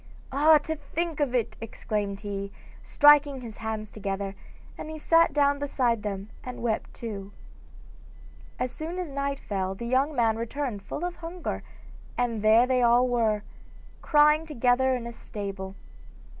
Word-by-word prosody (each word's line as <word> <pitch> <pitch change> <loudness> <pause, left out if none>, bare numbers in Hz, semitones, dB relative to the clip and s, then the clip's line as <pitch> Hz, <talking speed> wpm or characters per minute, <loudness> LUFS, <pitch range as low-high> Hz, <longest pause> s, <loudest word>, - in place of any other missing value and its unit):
'Ah, 305 +3 +6
to 315 +2 -3
think 320 +2 -4
of 275 -4 +1
it!' 235 -3 -1
exclaimed 210 -3 -3
he, 200 -1 -4 0.3
striking 290 -2 +5
his 225 -3 -9
hands 220 -1 -4
together, 195 -1 -3 0.4
and 310 - -7
he 315 - -6
sat 330 +1 +4
down 285 0 +2
beside 250 -5 0
them 200 0 -5
and 250 -2 -7
wept 225 -2 -1
too. 205 -4 -7 1.3
As 250 0 -2
soon 320 +7 -6
as 360 -5 -4
night 280 0 -2
fell 190 -2 -3
the 235 - -6
young 265 +5 +1
man 225 -3 +2
returned 235 -2 -3
full 320 - -5
of 355 0 -4
hunger, 345 +1 -5 0.6
and 235 -3 0
there 220 +3 +6
they 255 0 +2
were, - - +3
all 235 -3 +3 0.6
crying 300 +1 +4
together 260 -2 +2
in 245 - -4
the 235 - -6
stable. 195 -3 -6
245 Hz, 155 wpm, -27 LUFS, 215-290 Hz, 1.3 s, Ah